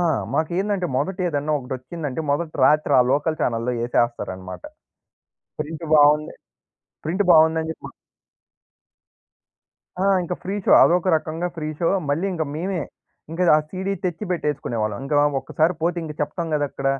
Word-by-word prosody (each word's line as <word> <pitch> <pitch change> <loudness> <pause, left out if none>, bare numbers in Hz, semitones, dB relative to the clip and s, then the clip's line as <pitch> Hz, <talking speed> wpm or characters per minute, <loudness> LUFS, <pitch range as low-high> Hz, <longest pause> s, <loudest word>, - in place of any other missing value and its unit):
ఆ! - - +2 0.3
మాకేందంటే, 185 +4 0
మొదటేదన్నా 155 -3 -1
ఒకటొచ్చిందంటే, 130 +3 -5
మొదటి 155 +2 -1
రాత్రి 155 0 +3
ఆ - - +7
లోకల్ 155 +2 0
ఛానెల్‌లో 115 +1 0
యేసేస్తారనమాట. 100 -7 -2 1.0
ప్రింట్ 160 +2 -5
బావుంది 150 0 +4 0.7
ప్రింట్ 185 +5 +1
బావుందని 160 0 +4
జెప్పి - - -8 2.1
ఆ! - - +1 0.2
ఇంక 180 +1 -3
ఫ్రీ 190 +2 -3
షో. - - +4
అదొక 180 +2 +3
రకంగా 160 +3 -3
ఫ్రీ 155 -1 -4
షో. 165 - +1 0.2
మళ్ళీ 165 +7 0
ఇంక 165 -3 -2
మేవే, 175 +1 -2 0.5
ఇంక 165 - -5 0.2
ఆ - - +4
సీడీ 190 +1 -3
తెచ్చిపెట్టేసుకునేవాళ్ళం. 150 - -2
ఇంకా 145 +1 0 0.2
ఒక్కసారి 160 +6 0
పోతే, 175 +2 +1
ఇంక 155 -1 -6
చెప్తాం 165 +3 -2
గదక్కడ. 145 -2 -2
155 Hz, 125 wpm, -22 LUFS, 145-175 Hz, 2.1 s, ఆ